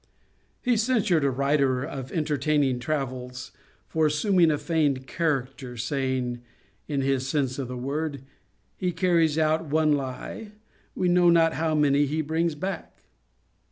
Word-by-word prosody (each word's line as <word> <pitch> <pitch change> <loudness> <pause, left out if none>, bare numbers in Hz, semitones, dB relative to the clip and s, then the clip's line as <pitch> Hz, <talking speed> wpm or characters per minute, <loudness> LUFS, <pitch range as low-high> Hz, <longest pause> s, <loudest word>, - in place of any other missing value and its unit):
He 245 -2 +2
censured 215 - +2
a 140 - +3
writer 135 -1 +1
of 135 -3 -6
entertaining 150 -4 +1
Travels 130 -2 -4 0.4
for 160 -1 +2
assuming 170 +3 +3
a 150 - +1
feigned 145 -5 0
character, 135 -6 -2
saying, 125 -1 -2 0.5
(in 140 -3 -1
his 135 -1 0
sense 135 -2 -1
of 135 - -3
the 125 0 -6
word,) 140 +2 -3 0.5
'He 180 -1 -1
carries 165 -3 +2
out 160 +1 +2
one 155 0 +2
lye; 145 - -5 0.4
we 185 - 0
know 175 0 +5
not 165 -1 +4
how 160 -1 0
many 145 -1 +3
he 155 +3 -1
brings 160 +1 0
back.' 185 +2 -6
150 Hz, 140 wpm, -26 LUFS, 135-165 Hz, 0.5 s, know